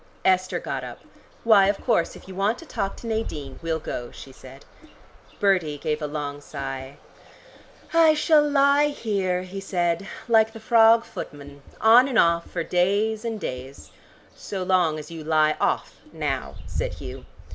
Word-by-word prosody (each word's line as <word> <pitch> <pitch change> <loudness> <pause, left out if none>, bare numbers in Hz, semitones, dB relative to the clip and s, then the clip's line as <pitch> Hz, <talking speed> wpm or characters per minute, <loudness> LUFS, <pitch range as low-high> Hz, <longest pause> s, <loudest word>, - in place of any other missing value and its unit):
Esther 185 0 +2
got - - -4
up. - - -9 0.4
"Why, 210 -4 +6
of 200 0 0
course, 170 - 0
if - - -14
you 190 - -9
want 200 +5 0
to 335 - -12
talk 195 -10 -3
to - - -11
Nadine, 160 -12 -4
we'll 165 -1 -1
go," 120 -6 -6
she 135 - -12
said. 130 +1 -14 0.7
Bertie 180 -8 +1
gave 150 +1 -2
a 150 - -2
long 145 -1 -5
sigh. 135 -1 -7 1.0
"I 325 -2 +6
shall 305 0 +4
lie 285 0 +3
here," 195 -10 -1
he 185 +1 -7
said, 175 -1 -1 0.2
"like 220 -1 +4
the 225 - -9
frog 225 0 +5
footman 145 -1 -9 0.2
on 235 +4 +6
and 255 -4 -1
off 170 0 +3
for 170 - -3
days 205 +6 +1
and 225 -2 -3
days 130 - -7 0.2
" - - -29
"So 190 -2 -5
long 180 -4 +2
as 150 +1 -9
you 165 -2 -7
lie 155 0 +2
off - - -1
now," - - -3
said - - -3
Hugh. - - -9
185 Hz, 170 wpm, -24 LUFS, 150-225 Hz, 1.0 s, Why